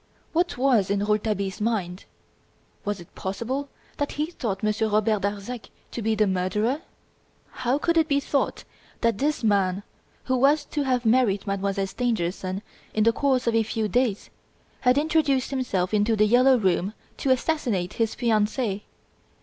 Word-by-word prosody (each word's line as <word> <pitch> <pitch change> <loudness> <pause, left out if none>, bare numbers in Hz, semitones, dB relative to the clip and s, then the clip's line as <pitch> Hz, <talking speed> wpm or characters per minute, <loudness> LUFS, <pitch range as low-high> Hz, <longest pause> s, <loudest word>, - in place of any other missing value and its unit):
What 345 -1 +1
was 245 -7 +3
in 200 0 +1
Rouletabille's 210 -2 -1
mind? 200 -5 -2 0.8
Was 205 -1 -2
it 170 - -14
possible 245 +9 -3 0.3
that 290 - -2
he 300 - 0
thought 210 - -4
Monsieur 215 +1 +1
Robert 215 0 +2
Darzac 205 +4 -4 0.2
to 235 - -4
be 220 0 +1
the 215 0 +3
murderer? 210 - 0 0.7
How 250 +3 0
could 335 +3 +1
it 320 -1 +4
be 280 -2 +2
thought 280 0 -1 0.4
that 230 -3 +1
this 295 -2 0
man, 200 -2 +2 0.4
who 260 0 0
was 290 +3 +3
to 295 - -3
have 255 -3 0
married 220 -4 +3
Mademoiselle 195 0 -1
Stangerson 190 -3 -2 0.3
in 215 - +3
the 230 +1 +4
course 260 -1 +1
of 235 - +1
a 225 - +4
few 220 0 -1
days, 230 -1 0 0.5
had 250 +1 +3
introduced 295 -4 +2
himself 215 -9 -1
into 210 +2 +3
"The 215 0 +4
Yellow 250 +4 +5
Room" 190 0 0 0.2
to 275 - -2
assassinate 250 - 0
his 225 -1 -1
fiancee? 215 -2 0
225 Hz, 160 wpm, -25 LUFS, 200-260 Hz, 0.8 s, Yellow